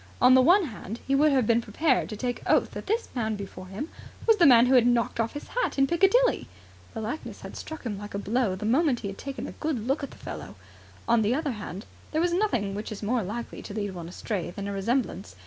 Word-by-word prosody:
On 250 +1 +7
the 260 - +7
one 355 +7 +5
hand, 225 -3 -7
he 270 - 0
would 295 +2 +5
have 260 -4 +3
been 230 +1 +3
prepared 255 +6 +1
to 215 - -6
take 245 +2 -3
oath - - +3
that - - -7
this 450 +3 0
man 220 -3 -1
before 190 -2 -8
him 205 - -5 0.4
was 450 -2 +5
the 345 - +6
man 240 -2 +8
who 255 - +3
had 245 -2 +6
knocked 235 -1 +1
off 230 0 0
his 290 - -8
hat - - -1
in 275 - +5
Piccadilly. 390 - +3 0.5
The 225 - -3
likeness 230 +9 -5
had - - -9
struck 315 -1 -7
him 205 -4 -3
like 205 0 -7
a - - 0
blow 210 0 0
the 195 - -5
moment 260 +2 +2
he 200 - -3
had 195 - -8
taken 275 -1 -5
a - - -6
good 280 -8 -3
look 270 +5 0
at 280 - -4
the - - -14
fellow. - - -8 0.5
On 235 -1 +4
the 220 +4 +2
other 300 -1 -1
hand, 205 -2 -7 0.3
there 315 +2 +2
is 350 -1 +1
nothing 245 - 0
which 210 +2 -5
is 215 0 -6
more 235 +3 +1
likely 220 +5 -5
to 205 - -8
lead 205 -3 -2
one 170 -2 -7
astray 185 0 -3
than 200 +3 -6
a 200 - -3
resemblance. 195 - -1
235 Hz, 250 wpm, -27 LUFS, 205-285 Hz, 0.5 s, man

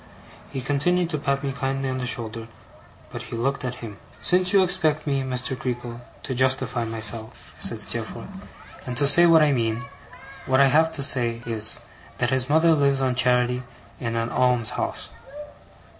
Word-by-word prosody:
He 135 - -5
continued 165 +6 0
to 155 - -2
pat 140 0 -1
me 140 - -2
kindly 135 0 -3
on 130 0 -3
the 125 - -3
shoulder, 115 -1 -2 0.6
but - - -6
he - - -8
looked 135 +4 -2
at 125 -1 -4
him. 105 -3 -10 0.2
'Since 180 +10 +3
you 195 -1 +5
expect 160 -4 0
me, 140 -2 0
Mr. 130 0 -3
Creakle, 120 -1 -5 0.2
to 135 - -4
justify 130 -2 0
myself,' 110 0 -1 0.3
said - - -1
Steerforth, - - -1 0.6
'and 125 -1 -4
to 145 - +3
say 170 +5 +6
what 165 -2 +6
I 150 - +3
mean, 115 -1 -1 0.6
what 130 0 +3
I 140 -1 +6
have 160 +1 +4
to 140 - -1
say 120 -4 +1
is, 110 -2 +1 0.4
that - - 0
his 130 0 0
mother 160 +2 +4
lives 140 -3 +2
on 130 -1 +1
charity 125 0 +2 0.4
in 115 -2 -3
an 115 +1 -2
alms 125 -3 +2
house. - - -4
130 Hz, 175 wpm, -23 LUFS, 120-140 Hz, 0.6 s, say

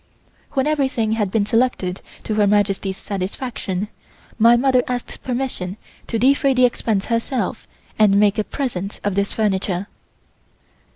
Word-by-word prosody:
When 270 -1 +1
everything 270 -7 +1
had 215 -3 0
been 205 +1 +1
selected 220 -5 0 0.2
to 215 - -2
Her 210 -1 +3
Majesty's 200 -1 +1
satisfaction, 200 -1 -4 0.5
my 235 +2 +7
mother 255 0 +3
asked 250 -1 -4
permission 245 -7 -3 0.3
to 230 - -1
defray 275 +3 +3
the 255 0 +5
expense 220 -4 0
herself 230 -2 -2 0.3
and 200 -2 +5
make 205 0 +3
a - - +2
present 205 -7 -4
of 205 - 0
this 200 +1 0
furniture. 195 -3 0
215 Hz, 135 wpm, -21 LUFS, 200-250 Hz, 0.5 s, my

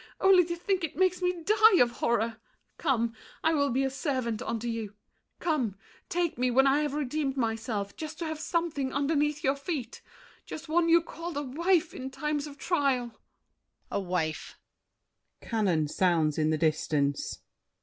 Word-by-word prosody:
Only 380 -1 +6
to 340 0 -3
think 365 +1 -1
it 325 - -3
makes 370 0 +2
me 360 -2 -1
die 430 +1 +6
of 240 -1 +5
horror! 230 -1 0 0.4
Come! 235 -3 +1 0.3
I 320 - +3
will 285 -2 +2
be 265 +3 +1
a 270 - +1
servant 255 -5 -2
unto 235 -2 -3
you. 225 -3 -4 0.4
Come! 270 - 0 0.3
Take 345 -7 -1
me, 250 0 +2
when 265 +2 +4
I 275 +2 +4
have 295 -1 -1
redeemed 285 -1 -1
myself, 225 -4 -2
Just 310 0 -6
to 340 - -4
have 315 -1 -4
something 320 -5 -1
underneath 295 +1 0
your 270 +1 +2
feet. 280 -4 -5 0.5
The - - -4
one 335 +1 +2
you 335 0 +6
called 335 0 -6
"a 290 - -1
wife" 330 +5 +1
in 260 +1 -6
times 295 +2 -2
of 285 -1 -11
trial— 275 -9 +1
DIDIER. 220 - -25 0.7
A - - 0
wife! 175 -5 -3 0.8
[Cannon 185 -9 0
sounds 160 -2 +1
in 155 0 +2
the 155 - +1
distance. 150 -2 0
275 Hz, 170 wpm, -29 LUFS, 230-325 Hz, 0.8 s, Only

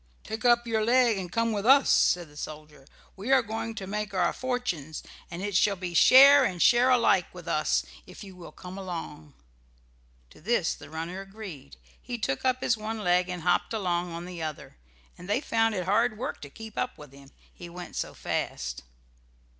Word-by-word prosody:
"Take 220 +2 -6
up 240 -1 +4
your 220 -2 0
leg 235 -2 +3
and 180 -2 -6
come 230 +2 0
with 205 -2 -2
us," 270 +4 +6
said 175 -2 +3
the 150 - -19
soldier. 150 -2 -9 0.3
"We 205 +7 -4
are 265 -2 +5
going 225 0 -5
to 200 -3 -6
make 210 0 -4
our 180 -2 +1
fortunes, 225 - -4 0.3
and 175 +1 -6
it 205 -2 -3
shall 200 +2 +3
be 180 -2 -6
share 275 +9 +8
and 185 -8 -1
share 240 +7 +5
alike 250 -2 +3
with - - -11
us - - +1 0.2
if - - -11
you 190 -2 -12
will 175 -2 -11
come 185 +2 -10
along." 160 -5 -7 1.0
To - - -18
this 195 -2 +1
the - - -13
runner 165 +4 -5
agreed. 195 -9 -10 0.2
He 245 -1 -5
took 135 -11 -2
up 255 0 +1
his 235 - +2
one 220 0 -5
leg 180 0 +2
and 180 -2 -5
hopped 175 +5 +1
along 175 -4 -1
on 170 +1 -6
the 180 -2 -8
other, 155 -2 -6 0.4
and 180 +2 -11
they 210 - +2
found 225 -5 0
it 180 -2 -3
hard 215 +4 +1
work 240 - -5
to 145 - -9
keep 220 +7 -9
up 250 - -3
with 150 -3 -13
him, 140 0 -15 0.2
he 175 - -10
went 175 +1 -9
so - - -4
fast. - - -4
195 Hz, 200 wpm, -27 LUFS, 170-230 Hz, 1.0 s, share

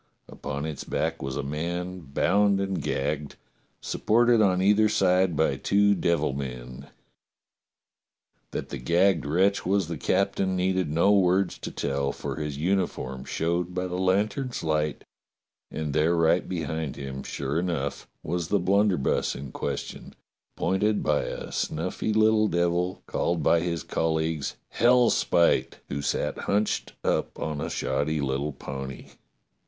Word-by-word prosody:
Upon 70 0 -5
its 75 -3 -5
back - - -2
was 65 0 -3
a 70 - -2
man 85 +5 -3
bound 100 +6 +2
and 95 -1 -2
gagged, 75 +1 -2 0.5
supported 120 +1 +3
on 95 -3 +3
either 105 +3 +4
side 90 -3 +3
by 80 +2 +1
two 100 0 +3
devil 85 -6 +1
men. 65 0 -6 1.6
That - - -5
the 70 - -5
gagged 85 +4 +2
wretch 95 +6 +2
was 95 -1 +1
the 85 - -5
captain 95 -1 +1
needed 95 -2 0
no 85 +6 +4
words 95 -1 +3
to - - -5
tell, 70 0 -1
for - - -5
his 75 -2 -4
uniform 75 -7 -1
showed 85 +2 -1
by 90 0 -1
the 90 0 -3
lantern's 105 +8 0
light, 75 -1 -1 0.7
and 75 -2 -4
there 80 +3 +3
right 85 +1 +2
behind 80 -4 -3
him, 65 -1 -6
sure 70 +4 -2
enough, 85 -6 -3 0.2
was 85 +1 -2
the 100 - +2
blunderbuss 95 -4 +1
in 70 -1 -7
question, - - -5 0.4
pointed 105 +4 +1
by 75 -1 +1
a - - -6
snuffy 90 +7 -2
little 110 0 +4
devil 85 0 0
called 85 -1 -1
by 85 - +4
his 85 -1 -2
colleagues 80 -2 -1 0.2
Hellspite, 120 -8 +4
who 70 - -3
sat - - -1
hunched 105 +1 0
up - - 0
on 75 -2 -3
a - - -3
shoddy 75 +1 -1
little 70 +1 -1
pony. 65 0 -7
85 Hz, 140 wpm, -26 LUFS, 75-95 Hz, 1.6 s, either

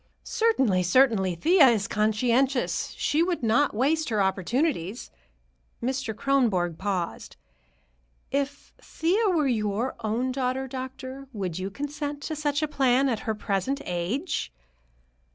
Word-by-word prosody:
"Certainly, 270 - +2
certainly. 190 -2 +3
Thea 320 - +5
is 220 -5 +2
conscientious. 240 +5 +1
She 305 - +1
would 345 -5 0
not 230 +3 +2
waste 305 +6 +1
her 215 -2 0
opportunities." 195 - -1 0.7
Mr. 255 -3 -2
Kronborg 215 - +1
paused. 190 -4 -3 1.0
"If 280 +1 -3
Thea 395 +7 +1
were 325 -5 +2
your 220 0 -1
own 230 +4 -1
daughter, 260 0 -1
doctor, 260 +1 -7
would 185 -5 -3
you 190 +1 -3
consent 290 +4 -5
to 315 - -3
such 295 0 -1
a - - +1
plan, 270 -2 +2
at 230 -4 -1
her 220 - 0
present 210 +6 -1
age?" 185 - -2
255 Hz, 125 wpm, -26 LUFS, 210-285 Hz, 1.0 s, Thea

